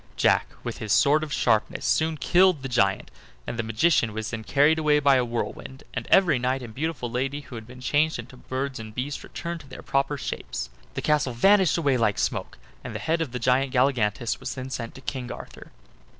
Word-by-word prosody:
Jack, - - +3 0.2
with - - -5
his 110 - -4
sword 145 +7 +5
of 155 -2 -5
sharpness, 110 -5 +1
soon 160 0 +1
killed 175 +3 +3
the - - -2
giant, 100 -7 +1 0.3
and 120 - -5
the - - +3
magician 110 +1 +2
was 110 0 -4
then 115 -2 -4
carried 145 +6 +3
away 150 -1 +3
by 140 -1 +5
a 125 - +2
whirlwind; 120 +3 -5
and - - -4
every 175 -9 +5
knight 130 +1 -1
and 115 -2 -9
beautiful 150 -1 -3
lady 135 +4 -2
who 140 - -14
had 110 -2 -8
been 125 +1 -12
changed 155 +5 +2
into 120 +2 -9
birds 130 +1 -4
and 110 -1 -9
beasts 135 +3 -4
returned 170 0 -5
to 140 - -14
their 130 - -10
proper 140 +1 0
shapes. 65 - -5 0.2
The - - -3
castle 150 -4 +2
vanished 190 - +4
away 140 -6 +2
like 110 -3 +1
smoke, - - -2 0.3
and - - -7
the - - -3
head 165 +1 0
of 155 -6 -2
the 125 - -3
giant 130 +2 +1
Galligantus 120 -4 +1
was - - -5
then 130 0 -6
sent 115 -3 -5
to 130 - -11
King 130 -2 -5
Arthur. - - -10
130 Hz, 215 wpm, -25 LUFS, 120-150 Hz, 0.3 s, sword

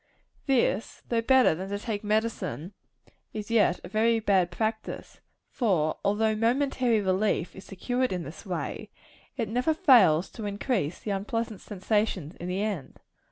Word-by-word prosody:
This, 240 -5 +1
though 230 -1 +2
better 260 -4 +5
than 185 +4 -5
to 200 - -2
take 210 -1 -4
medicine, 210 -4 -1 0.6
is 215 +1 -5
yet 210 -6 +3
a - - -7
very 225 +3 +2
bad 190 -5 +2
practice; 220 +4 -4 0.3
for 175 - 0
although 215 +2 +2
momentary 245 0 +2
relief 190 -2 0
is 190 - -11
secured 245 +6 -1
in 180 -2 -2
this 155 +1 -9
way, 185 -5 -4 0.5
it 230 -4 -1
never 250 +8 +1
fails 190 - +5
to 220 - -7
increase 200 - -1
the 210 - -5
unpleasant 215 +2 -3
sensations 205 -5 -1
in 175 - -6
the 185 +3 -1
end. 200 -10 -4
210 Hz, 150 wpm, -27 LUFS, 190-230 Hz, 0.6 s, better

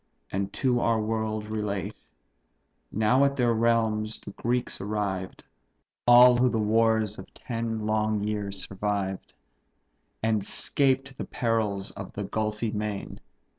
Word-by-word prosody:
and 100 +1 -2
to 125 0 +1
our 115 -1 +2
world 110 0 -2
relate. 105 -3 -3 1.0
Now 110 +6 +3
at 140 0 +2
their 125 -3 +2
native 115 -1 +1
realms 110 -2 +1
the - - -9
Greeks 120 +1 -2
arrived; 100 -2 -3 0.6
All 125 +1 +9
who 125 +1 +3
the 115 - -1
wars 110 -1 +2
of 95 - -11
ten 115 -2 -3
long 110 0 +1
years 105 -2 -2
survived; 95 -1 -3 0.9
And 110 -2 +1
'scaped 135 +4 +1
the - - -3
perils 110 -5 -1
of 100 -1 -9
the 100 - -4
gulfy 110 +2 -2
main. 105 -1 -4
110 Hz, 135 wpm, -27 LUFS, 105-115 Hz, 1.0 s, All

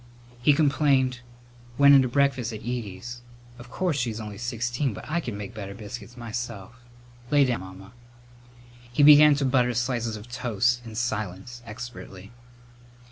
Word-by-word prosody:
He 145 +4 +5
complained: 140 -3 +2 0.6
"Went 140 0 +7
in 135 - +8
to 130 - +1
breakfast 130 -2 +1
at 110 -1 -7
Edie's. 120 0 -6 0.4
Of 120 0 -12
course 170 -1 -1
she's 115 -3 -2
only 105 -2 -7
sixteen, 120 +1 -2
but - - -9
I 170 +3 0
could 120 -10 -5
make 100 -1 -7
better 100 -2 -7
biscuits 115 +3 -9
myself. 115 -2 -6 0.6
Lay 145 -1 +4
down, 125 -2 -1
Mamma." 95 +1 -11 1.0
He 135 +4 +2
began 150 0 +8
to 140 -1 -1
butter 125 -2 +2
slices 120 -2 -1
of 105 +2 -10
toast, 120 -1 0
in 110 - -9
silence, 110 0 -4
expertly. 105 -4 -9
120 Hz, 150 wpm, -25 LUFS, 110-130 Hz, 1.0 s, in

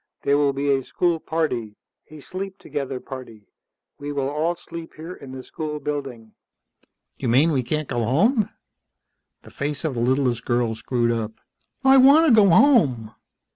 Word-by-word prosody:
There 140 - +3
will 145 -1 +3
be 140 +1 -1
a 135 -1 0
school 170 +2 0
party, 125 -11 -2 0.3
a 155 0 -12
sleep 190 +4 -7
together 135 -2 -5
party. 125 -6 -10 0.5
We 145 0 -5
will 140 -1 -1
all 160 +4 -1
sleep 165 -1 -10
here 165 +3 -8
in 140 -6 -11
the 130 -1 -8
school 150 +1 -5
building." 135 -7 -5 0.9
"You 130 - -2
mean 140 +8 +4
we 135 -4 +1
can't 150 +4 -3
go 120 - -2
home?" 205 - +2 0.9
The - - -15
face 145 +3 -4
of 155 - -1
the 120 - -3
littlest 125 -1 +1
girl 120 -2 0
screwed 120 +1 -1
up. 115 -2 -3 0.5
"I 270 0 +6
want 280 +5 +7
to 285 - +5
go 210 -3 +6
home." 165 - +4
140 Hz, 170 wpm, -23 LUFS, 125-165 Hz, 0.9 s, want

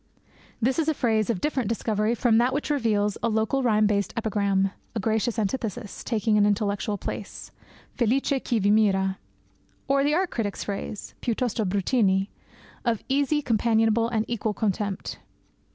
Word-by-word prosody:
This 255 +6 +1
is 320 - +1
a 315 - +1
phrase 220 -4 +1
of 215 -6 -1
different 265 -7 -1
discovery 220 0 0
from 230 -1 +3
that 245 +2 +2
which 295 +1 -2
reveals 210 -7 +1
a 230 - +1
local 220 +5 +1
rhyme 215 -4 +3
balanced 200 -1 0
epigram, 200 -3 +1 0.2
a - - 0
gracious 220 +3 0
antithesis, 220 0 -3
taking 215 -2 +1
an 205 - +5
intellectual 205 0 0
place - - -6 0.4
Felice 265 +3 +1
chi 235 - 0
vi 205 -1 +2
mira 195 -3 +2 0.7
or 275 0 +3
the 295 +2 +2
art 365 +1 0
critic's 210 -4 -3
phrase 205 +1 -5
piuttosto 235 -2 -1
bruttini 195 0 +1 0.5
of 235 -4 0
easy, 285 +2 +1
companionable, 225 0 +2
and 220 -2 0
equal 220 -2 -2
contempt. 200 -2 -2
220 Hz, 150 wpm, -25 LUFS, 205-240 Hz, 0.7 s, an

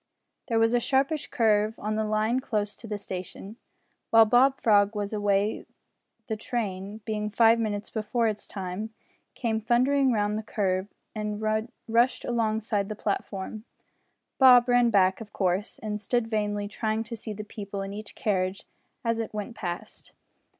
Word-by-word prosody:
There 230 - +1
was 225 +1 +3
a 245 - +4
sharpish 275 +4 +1
curve 215 -1 +2
on 215 +1 -3
the 220 0 0
line 215 +3 +1
close 210 -5 -2
to 230 - -11
the 210 -1 -3
station. 195 +2 -7 0.5
While 225 0 +7
Bob 255 +5 +4
Frog 205 -1 +4
was 205 0 -3
away 205 0 0 0.6
the 220 - -2
train, 210 -2 -4
being 210 -1 -2
five 230 +1 +5
minutes 210 -2 -2
before 225 +2 0
its 210 -1 -3
time, 195 +3 -5 0.4
came 225 -3 -1
thundering 255 +4 +3
round 210 -1 0
the - - -3
curve 195 -3 -1 0.3
and 210 -1 -3 0.5
rushed 235 +3 +2
alongside 220 -3 0
the 215 - -4
platform. 205 0 -4 0.8
Bob 250 -2 +8
ran 245 -1 +4
back 190 -1 +3
of 215 - -10
course 190 +2 -1
and 210 -1 -4
stood 240 +2 0
vainly 210 -2 -1
trying 220 +1 -2
to 230 +1 -7
see 220 0 -7
the 210 +1 -6
people 200 -2 -6
in 195 0 -6
each 210 +1 -8
carriage 190 -2 -1 0.4
as 230 0 +1
it 225 -1 -4
went 210 +2 -4
past. 175 -4 -6
215 Hz, 160 wpm, -27 LUFS, 205-230 Hz, 0.8 s, Bob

